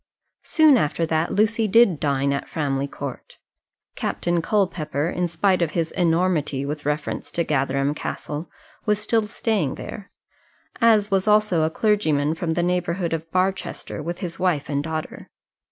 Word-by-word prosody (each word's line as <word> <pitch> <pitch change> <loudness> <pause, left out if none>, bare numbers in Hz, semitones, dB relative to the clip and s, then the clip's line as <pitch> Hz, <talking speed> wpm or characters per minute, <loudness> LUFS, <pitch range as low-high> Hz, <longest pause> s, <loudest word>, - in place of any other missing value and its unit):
Soon 310 -6 +5
after 160 +1 0
that, 160 +1 0
Lucy 220 +2 +2
did 205 -6 +5
dine 140 -1 +1
at 140 - -4
Framley 140 -3 -1
Court. 140 -2 -8 0.6
Captain 175 -1 -1
Culpepper, 165 -6 0
in 180 0 -1
spite 180 +3 +1
of 165 -2 0
his 165 -2 -1
enormity 165 -5 +1
with 145 0 -4
reference 150 0 -2
to 170 +3 -1
Gatherum 140 -1 0
Castle, 150 +1 -5 0.4
was 210 0 +3
still 215 +1 0
staying 205 - -1
there, 205 -2 -8 0.7
as 215 -3 +4
was 195 +1 +1
also 210 -5 +4
a 155 - +2
clergyman 160 -7 +1
from 165 0 -2
the 175 - +1
neighbourhood 175 -1 -1
of 165 0 -4
Barchester 185 -3 -2
with 170 +3 -4
his 170 -2 -5
wife 175 -6 0
and 145 -1 0
daughter. 160 0 -5
170 Hz, 155 wpm, -23 LUFS, 150-195 Hz, 0.7 s, Soon